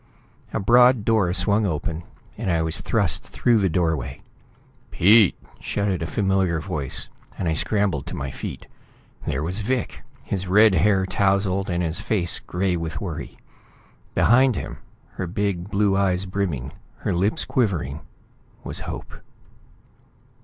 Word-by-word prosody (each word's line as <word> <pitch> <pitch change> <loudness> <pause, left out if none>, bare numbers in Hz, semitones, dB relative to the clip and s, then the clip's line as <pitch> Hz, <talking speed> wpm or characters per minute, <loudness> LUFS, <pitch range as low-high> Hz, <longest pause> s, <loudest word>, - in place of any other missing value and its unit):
A - - -1
broad 120 +2 +5
door 110 -6 +3
swung 100 +4 +1
open, 80 0 -3 0.3
and 110 -3 -3
I 85 -2 +2
was 80 +4 0
thrust 105 -7 +1
through 120 -2 +1
the 95 -2 +2
doorway. 80 -7 -1 0.7
"Pete!" 105 +1 +5 0.2
shouted 100 -3 -1
a 80 - -2
familiar 95 -3 +1
voice, 80 -6 -3 0.3
and 90 - -2
I 80 - +1
scrambled 95 -2 0
to - - -5
my 70 -1 -4
feet. - - -7 0.6
There 65 - -1
was 90 +6 -2
Vic, 125 +4 -2 0.2
his 95 -1 -3
red 105 +3 +6
hair 95 +2 +3
tousled, 95 0 +1
and 90 0 0
his 80 -1 -2
face 90 -6 -1
gray 90 0 -1
with 85 -1 -4
worry. 90 -6 -6 0.8
Behind 130 +1 +4
him, - - -6 0.4
her 95 - -2
big 100 -1 -2
blue 100 -1 +2
eyes 95 -1 +1
brimming, 90 -9 -3 0.3
her - - -1
lips 95 +5 +1
quivering, 85 - -1 0.6
was - - -3
Hope. - - -7
95 Hz, 140 wpm, -23 LUFS, 85-105 Hz, 0.8 s, red